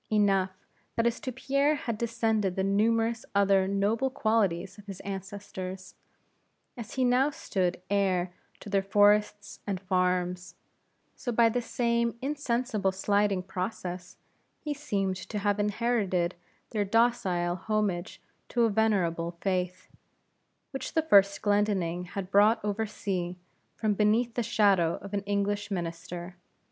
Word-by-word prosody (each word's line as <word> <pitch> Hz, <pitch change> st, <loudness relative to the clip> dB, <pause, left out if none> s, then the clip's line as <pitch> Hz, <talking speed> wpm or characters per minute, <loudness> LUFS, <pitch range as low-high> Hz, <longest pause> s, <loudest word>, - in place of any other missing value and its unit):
Enough, 195 Hz, -3 st, +3 dB, 0.5 s
that 230 Hz, -, +1 dB
as 235 Hz, 0 st, +1 dB
to 260 Hz, -, -4 dB
Pierre 275 Hz, +4 st, +1 dB
had 235 Hz, -6 st, -3 dB
descended 220 Hz, -4 st, 0 dB
the 190 Hz, -, 0 dB
numerous 225 Hz, +3 st, +1 dB
other 195 Hz, -1 st, +4 dB
noble 205 Hz, +6 st, +1 dB
qualities 205 Hz, -6 st, 0 dB
of 205 Hz, -, -15 dB
his 195 Hz, -2 st, -7 dB
ancestors; 190 Hz, -1 st, -6 dB, 0.8 s
and 240 Hz, -, -5 dB
as 220 Hz, -, -12 dB
he 260 Hz, -1 st, +2 dB
now 250 Hz, +3 st, +4 dB
stood 185 Hz, -10 st, -2 dB
heir 185 Hz, -3 st, +1 dB, 0.3 s
to -, -, -10 dB
their 200 Hz, -1 st, +2 dB
forests 205 Hz, +1 st, +2 dB
and 195 Hz, -2 st, -1 dB
farms; 180 Hz, -1 st, -1 dB, 0.6 s
so 245 Hz, -, -4 dB
by 230 Hz, 0 st, +4 dB
the 245 Hz, +2 st, -1 dB
same 235 Hz, 0 st, 0 dB
insensible 250 Hz, -7 st, -1 dB
sliding 200 Hz, 0 st, +1 dB
process, 185 Hz, -1 st, -5 dB, 0.4 s
he 300 Hz, -, -3 dB
seemed 200 Hz, -10 st, -2 dB
to 210 Hz, -, -6 dB
have 205 Hz, 0 st, 0 dB
inherited 205 Hz, -4 st, 0 dB, 0.4 s
their 210 Hz, -2 st, 0 dB
docile 195 Hz, -5 st, +1 dB
homage 195 Hz, -2 st, -2 dB, 0.3 s
to 240 Hz, -, +2 dB
a 225 Hz, -, +3 dB
venerable 175 Hz, -6 st, +1 dB
Faith, 185 Hz, -1 st, -2 dB, 0.8 s
which 270 Hz, -, -5 dB
the 320 Hz, -, +3 dB
first 200 Hz, -9 st, +4 dB
Glendinning 200 Hz, -4 st, +1 dB
had 185 Hz, +1 st, -6 dB
brought 210 Hz, +3 st, +5 dB
over 210 Hz, +2 st, -1 dB
sea, 180 Hz, -4 st, -3 dB, 0.4 s
from 215 Hz, -2 st, 0 dB
beneath 220 Hz, +3 st, +2 dB
the 240 Hz, -, -1 dB
shadow 200 Hz, -7 st, +3 dB
of 200 Hz, 0 st, -9 dB
an 200 Hz, -, 0 dB
English 205 Hz, +1 st, -1 dB
minister. 175 Hz, -1 st, -5 dB
205 Hz, 135 wpm, -28 LUFS, 185-225 Hz, 0.8 s, brought